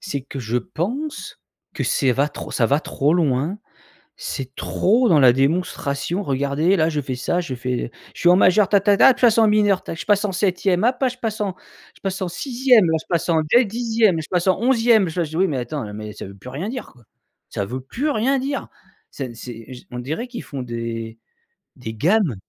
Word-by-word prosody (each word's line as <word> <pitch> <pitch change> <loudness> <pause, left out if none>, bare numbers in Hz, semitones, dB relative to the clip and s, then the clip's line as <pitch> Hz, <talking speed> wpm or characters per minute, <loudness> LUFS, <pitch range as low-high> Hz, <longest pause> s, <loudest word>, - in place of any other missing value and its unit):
C'est 165 -8 -4
que 135 +1 -8
je 120 -1 -2
pense 220 - -5 0.3
que - - -3
c'est 130 -2 +2
va 140 +4 +1 0.2
ça 115 - +1
va 140 +5 +2
trop 150 +1 0
loin. 155 +3 0 0.6
C'est 135 -1 -5
trop 230 +5 +2
dans 160 -5 +5
la 130 -3 +7
démonstration: 145 +4 -1
«Regardez, 140 +5 +1
là 160 -3 +2
je 150 -2 -2
fais 130 -2 -4
ça, 135 +7 -1
je 135 -7 -5
fais, 125 0 -3 0.2
je - - -13
suis 175 - +4
en 180 - +7
majeur, 190 +1 +4
ta, 200 - +5
ta, 200 +1 +3
ta, - - +6
de 265 - +7
toute - - -13
façon 225 -2 +5
mineur, 210 -2 +3
ta, - - -6
je - - -7
passe 205 -1 +3
en 200 - -1
7e, 185 0 +1
hop 245 +3 +3
je 250 - -10
passe 220 -3 -3
en, 195 -3 -2 0.4
je - - -23
passe 195 -1 -3
en 185 - -1
6e 245 +3 +3
là, 160 - +2
je - - -19
passe 170 0 0
en 160 -2 +3
2 245 0 +6
10e, 220 -5 +1
je 155 - -10
passe 180 -1 0
en 185 +1 +3
11e. 230 -6 +3
Je 175 +2 -2
me». 160 -1 -4
Oui 190 - +3
mais 145 -6 -2
attends, 120 -3 -4
mais 105 0 -7
ça - - -8
ne 100 - -9
veux 100 - -15
plus 125 - -10
rien 150 +11 -4
dire, 255 +1 -6
quoi. 120 - -21 0.5
Ça 100 - -3
veut 125 +5 -5
plus 260 - -3
rien 265 +3 +1
dire. 275 +2 -3 0.4
C'est, 130 -4 -7
c'est 120 +1 -9
je 125 - -11
On 125 - -5
dirait 155 - -4
qu'ils 245 -1 -7
font 140 -2 -6
des 115 -2 -5 0.6
des 115 -4 -7
gammes. 170 - +2
175 Hz, 225 wpm, -21 LUFS, 130-210 Hz, 0.6 s, la